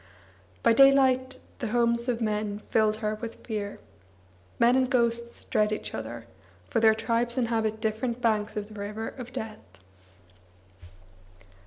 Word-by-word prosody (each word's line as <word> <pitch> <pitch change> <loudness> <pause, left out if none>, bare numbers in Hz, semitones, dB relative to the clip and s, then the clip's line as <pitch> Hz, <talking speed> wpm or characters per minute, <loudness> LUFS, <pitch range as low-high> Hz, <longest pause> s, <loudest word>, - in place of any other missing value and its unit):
By - - +5
daylight 260 0 +5 0.2
the 240 - -2
homes 235 +1 +1
of 240 -1 -1
men 210 -1 -2
filled 215 -1 +3
her 210 - +1
with 230 -1 -8
fear. 210 -3 -4 0.8
Men 240 +2 +5
and 260 -1 +2
ghosts 235 -1 0
dread 210 0 +1
each 215 - -4
other, 115 +1 -6 0.4
for - - 0
their 220 -1 +5
tribes 235 +2 -1
inhabit 225 -3 0
different 225 +2 -2
banks 215 -3 0
of 210 0 -4
the 210 -1 -10
river 210 +2 -4
of 250 -2 -9
death. 220 -3 -6
225 Hz, 140 wpm, -27 LUFS, 215-240 Hz, 0.8 s, By